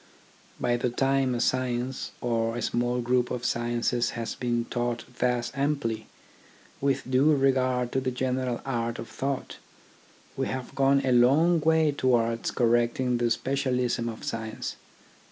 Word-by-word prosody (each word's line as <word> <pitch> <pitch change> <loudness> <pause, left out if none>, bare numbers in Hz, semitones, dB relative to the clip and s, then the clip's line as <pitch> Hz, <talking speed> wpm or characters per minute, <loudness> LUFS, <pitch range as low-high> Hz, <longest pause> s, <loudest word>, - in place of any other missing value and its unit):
By 120 -1 +1
the 125 - 0
time 135 +1 +1
a - - -2
science, 130 +1 -1
or 115 -1 0
a - - -3
small 120 +1 0
group 125 +1 +1
of 125 -1 -4
sciences, 120 0 0
has 115 -2 -3
been 120 -1 -1
taught 120 -1 -2
thus 125 -1 0
amply, 135 -6 -1 0.7
with 135 -1 0
due 140 +4 +4
regard 130 -2 +1
to 130 - 0
the 130 - -1
general 125 -1 -2
art 120 -3 -2
of 115 - -7
thought, 135 0 -4 0.8
we - - -1
have 130 -1 -5
gone 140 0 +3
a 130 - +2
long 145 +8 +5
way 160 0 +3
towards 115 -4 +1
correcting 120 +1 +1
the 120 0 +2
specialism 125 -1 0
of 110 - -8
science. 110 -1 -4
125 Hz, 145 wpm, -27 LUFS, 120-130 Hz, 0.8 s, long